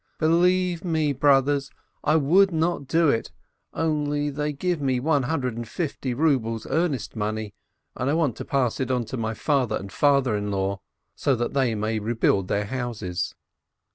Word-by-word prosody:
Believe 175 +2 +2
me, 160 -4 +1
broth 135 0 +4
ers, 140 -1 0 0.3
I 155 - +3
would 180 +6 +4
not 160 -3 -1
do 165 +3 +3
it, 115 -4 0 0.4
only 150 -2 -1
they 150 +1 -2
give 170 +2 -2
me 130 -2 +1
one 145 +1 +2
hundred 130 -3 -1
and 120 0 -5
fifty 135 -3 -3
rubles 120 -7 +1
earnest 155 -4 -1
money, 110 -1 -3 0.4
and 130 - -1
I 150 - +2
want 150 -8 +1
to - - -5
pass 135 -6 0
it 130 -2 -1
on 125 -2 0
to 130 - -6
my 110 -1 -2
father 130 -7 +1
and 100 0 -6
father 140 -5 +3
in 105 0 -2
law, 100 0 -1 0.3
so 135 - +1
that 120 0 -2
they 130 -5 +1
may 110 +1 -1
rebuild 105 -3 +1
their 100 +2 0
houses. 105 -8 -3
135 Hz, 175 wpm, -25 LUFS, 115-155 Hz, 0.4 s, broth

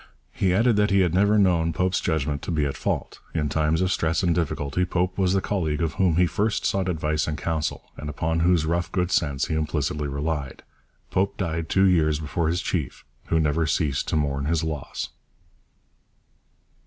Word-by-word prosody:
He 95 - +1
added 110 +4 +3
that 105 0 +3
he 100 -1 +4
had 90 -3 +1
never 100 +3 +4
known 85 -5 +3
Pope's 90 +3 0
judgment 75 -3 -1
to - - -7
be 75 -3 +1
at 70 - -2
fault. - - -3 0.2
In 75 -2 0
times 80 +2 +1
of 95 0 +1
stress 80 0 0
and 85 -2 +3
difficulty 80 0 -1
Pope 90 0 -1
was 95 -2 +1
the 95 - +2
colleague 80 -7 -1
of 80 - -1
whom 95 -4 +2
he 90 +1 +4
first 105 +5 -1
sought 95 -1 0
advice 75 -2 -1
and 75 -1 -2
counsel, 80 -1 -3
and 75 - -6
upon 80 +3 -1
whose 85 -1 +3
rough 85 +1 -1
good 90 -1 0
sense 70 -4 +1
he - - -3
implicitly 75 -1 -1
relied. 70 0 -3 0.5
Pope 95 +1 0
died 80 -3 -2
two 95 0 +4
years 80 -4 +3
before 80 +2 -1
his 90 +2 0
chief, 80 -8 -3 0.2
who 80 - +2
never 80 +1 +1
ceased 75 -4 0
to - - -1
mourn 70 -2 0
his 80 +1 0
loss. 75 -3 -4
80 Hz, 190 wpm, -24 LUFS, 75-90 Hz, 0.5 s, he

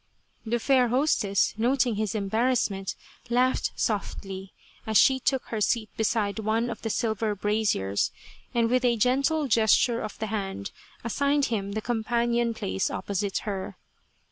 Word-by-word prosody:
The 235 +2 +1
fair 255 +1 +3
hostess, 240 -6 +2
noting 245 +1 +2
his 215 0 -2
embarrassment, 215 -1 0 0.3
laughed 250 +2 +2
softly, 195 -2 -3 0.4
as 220 -1 +3
she 265 -1 +5
took 265 0 0
her 220 -2 -3
seat 215 0 +1
beside 220 -1 0
one 225 +3 0
of 225 - -7
the 225 - -3
silver 220 -2 -1
braziers, 205 - 0 0.4
and 235 -1 +2
with 250 +2 +1
a 240 -2 +3
gentle 275 +6 +2
gesture 230 +1 +3
of 215 - -6
the 220 - -3
hand 195 - -3 0.3
as 235 - -3
signed 280 0 +2
him 200 -2 -2
the 220 - -2
companion 235 0 0
place 95 - -1
opposite 200 0 -2
her. 195 -3 -4
225 Hz, 145 wpm, -27 LUFS, 205-245 Hz, 0.4 s, she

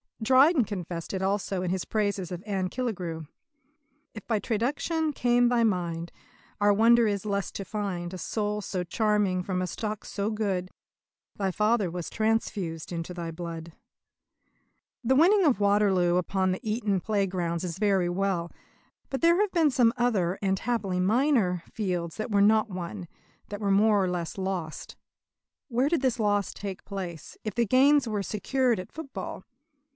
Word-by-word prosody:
Dryden 265 +4 +5
confessed 175 -5 -5
it 190 - -2
also 195 -1 -1
in 180 - -1
his 185 -1 -2
praises 200 -4 -1
of 180 +1 -6
Anne 190 -3 -1
Killigrew: 180 - -4 0.9
"If 220 - -9
by 220 -3 +1
traduction 290 - -1
came 245 -1 +3
thy 240 -1 +3
mind, 170 -5 -1 0.5
Our 205 0 +4
wonder 230 +2 +5
is 200 -2 -1
the 215 - -4
less 200 -1 -1
to 195 - -5
find 190 -4 -4
A - - -5
soul 210 +3 -2
so 185 -2 -3
charming 205 -1 +1
from 185 0 -2
a 185 - -1
stock 215 +2 -4
so 200 +1 -2
good. 200 -4 -2 0.7
Thy 195 -2 0
father 210 0 +1
was 175 0 -5
transfused 205 -7 -1
into 170 +1 -4
thy 170 -2 -5
blood." 165 -1 -7 1.3
The 260 +3 +3
winning 375 +8 +5
of 280 - +3
Waterloo 200 -4 +3
upon 185 +1 0
the 185 - -2
Eton 210 -3 0
playgrounds 180 -4 -1
is 170 -2 -4
very 195 -4 +2
well; 175 -2 -1 0.6
but 270 - -3
there 340 +2 +5
have 415 -2 +2
been 325 -4 +3
some 240 -3 +4
other, 200 -7 +1
and 195 -1 +1
happily 200 -5 -1
minor, 210 - +2
fields 180 -6 -3
that 215 +1 -4
were 200 -1 +3
not 215 +2 +4
won 180 0 -6 0.4
that 205 +1 -6
were 200 -1 +1
more 205 0 +4
or 185 - 0
less 175 -1 -3
lost. 185 -5 -4 0.7
Where 255 +1 +1
did 330 -4 +1
this 255 -3 +1
loss 205 -2 +1
take 195 -2 -7
place, 180 -6 -7
if 215 - -3
the 235 - +2
gains 270 +4 +4
were 210 -2 -1
secured 235 +3 0
at 185 - -8
football? 265 -11 -7
200 Hz, 165 wpm, -27 LUFS, 180-225 Hz, 1.3 s, Dryden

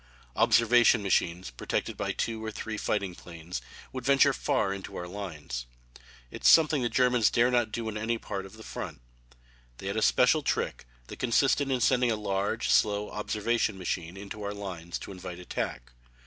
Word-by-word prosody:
Observation 115 -1 +5
machines 90 -3 0
protected - - -3
by - - -2
two 110 -1 -3
or 110 - -3
three 110 0 -5
fighting 100 -3 -1
planes 85 -6 -8 0.3
would 130 -2 -5
venture 140 +1 +5
far 130 -9 0
into 100 -1 -8
our 90 - -5
lines. 80 -11 -6 0.6
It - - -8
is - - +3
something 155 -3 +6
the 120 - 0
Germans 125 -3 +3
dare 120 +1 +3
not 120 -3 +2
do 115 +1 -3
on 110 -1 -3
any 115 +2 0
other - - -6
part 95 0 -4
of 95 - -17
the 110 - -11
front. - - -6 0.8
They - - -10
had - - -2
a - - +1
special 60 -1 +4
trick - - -2 0.2
that - - -10
consisted 135 +3 +2
in 130 -2 0
sending 125 -1 +3
a 115 - +2
large, 100 +1 -1
slow 105 0 +2
observation 105 0 -1
machine 90 -1 -4
into 100 +2 -8
our 100 0 -4
lines 90 -4 -5
to - - -9
invite 90 -2 -7
attack. 75 -8 -4
105 Hz, 185 wpm, -29 LUFS, 90-120 Hz, 0.8 s, something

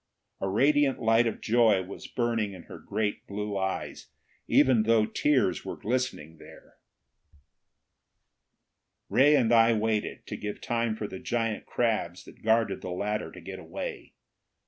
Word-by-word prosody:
A 95 - -2
radiant 140 +6 +3
light 115 +1 +3
of 115 - -4
joy 110 -4 +3
was 95 +2 -9
burning 115 -4 -1
in 90 -3 -11
her - - -11
great 105 -2 -3
blue 105 0 -4
eyes, 95 -1 -3 0.4
even 130 -4 +4
though 110 0 +3
tears 130 -8 +1
were - - -6
glistening 115 -10 -3
there. - - -16 2.3
Ray 145 +3 +5
and 120 -4 +3
I 115 0 +6
waited, 110 -1 -1
to - - -6
give 105 0 -5
time 115 -1 -1
for 110 - -5
the 95 -2 -7
giant 115 -2 -2
crabs 110 -7 -1
that - - -15
guarded 110 -2 +1
the - - -6
ladder 105 +4 -3
to - - -11
get - - -8
away. - - -7
110 Hz, 145 wpm, -28 LUFS, 105-120 Hz, 2.3 s, I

